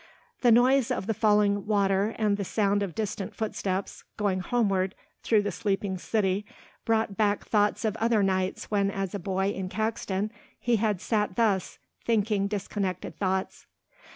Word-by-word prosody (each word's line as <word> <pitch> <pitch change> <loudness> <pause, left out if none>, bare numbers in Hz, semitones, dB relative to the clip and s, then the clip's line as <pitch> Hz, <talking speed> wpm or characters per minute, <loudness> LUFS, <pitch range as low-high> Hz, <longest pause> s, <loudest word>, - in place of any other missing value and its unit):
The 245 - +5
noise 250 +2 +5
of - - -1
the 225 - 0
falling 210 -1 +2
water 200 0 +2
and 210 -2 +2
the 200 - -3
sound 205 +1 +1
of 195 -5 -3
distant 205 -3 -3
footsteps 200 -3 -3
going 200 -3 0
homeward 195 -3 0 0.3
through 215 -2 +3
the 205 - -1
sleeping 195 -2 -2
city 200 -1 0 0.4
brought 220 -3 +1
back 205 -1 +1
thoughts 210 +2 +1
of 215 -1 0
other 225 -2 +2
nights 190 +1 -1
when 200 -1 +2
as 195 -2 -3
a 200 - -3
boy 190 +1 0
in 190 -2 -4
Caxton 215 -1 -2 0.3
he 240 -1 +2
had 210 -4 0
sat 210 -4 0
thus, 210 -5 +1 0.3
thinking 210 -3 +1
disconnected 200 -2 -3
thoughts. 190 -1 -2
205 Hz, 155 wpm, -27 LUFS, 195-220 Hz, 0.4 s, The